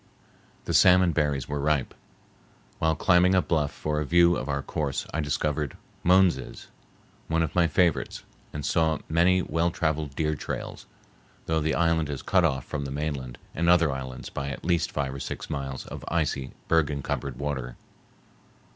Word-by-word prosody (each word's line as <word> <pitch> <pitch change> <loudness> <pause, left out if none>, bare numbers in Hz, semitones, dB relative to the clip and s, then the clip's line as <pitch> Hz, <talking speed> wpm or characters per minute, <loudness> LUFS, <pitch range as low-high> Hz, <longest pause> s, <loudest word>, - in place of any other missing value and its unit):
The - - -2
salmon 90 -1 +6
berries 75 -4 0
were 75 0 -3
ripe. 75 -2 0 0.9
While 80 0 +2
climbing 90 +2 +4
a 95 - +5
bluff 75 -4 0
for 75 0 -2
a - - -2
view 85 +1 +5
of 70 - -4
our 70 -1 -1
course, 70 -3 -2
I 80 - -1
discovered 75 -1 -1 0.3
moneses, 90 -7 +2 0.6
one 80 0 +1
of 80 - -3
my 85 -2 +3
favorites, 80 -4 +1 0.3
and 75 -1 -5
saw 80 -1 +2
many 90 +3 +3
well 85 +2 0
traveled 80 -4 -2
deer 75 0 0
trails, - - -6 0.6
though 80 0 +1
the 80 +1 0
island 80 -2 +1
is 70 -2 -5
cut 95 -2 +3
off 65 -6 +1
from 70 -2 -4
the - - -4
mainland 70 -4 -4 0.2
and 85 +1 +1
other 85 -4 +5
islands 65 -1 -6
by 70 0 -4
at 70 - -7
least 85 -2 +1
five 70 -2 -2
or 70 - -6
six - - -6
miles 70 -2 -4
of - - -8
icy, 75 -5 -1
berg 80 -3 +3
encumbered 70 -2 -3
water. 65 -4 -4
75 Hz, 170 wpm, -26 LUFS, 70-85 Hz, 0.9 s, salmon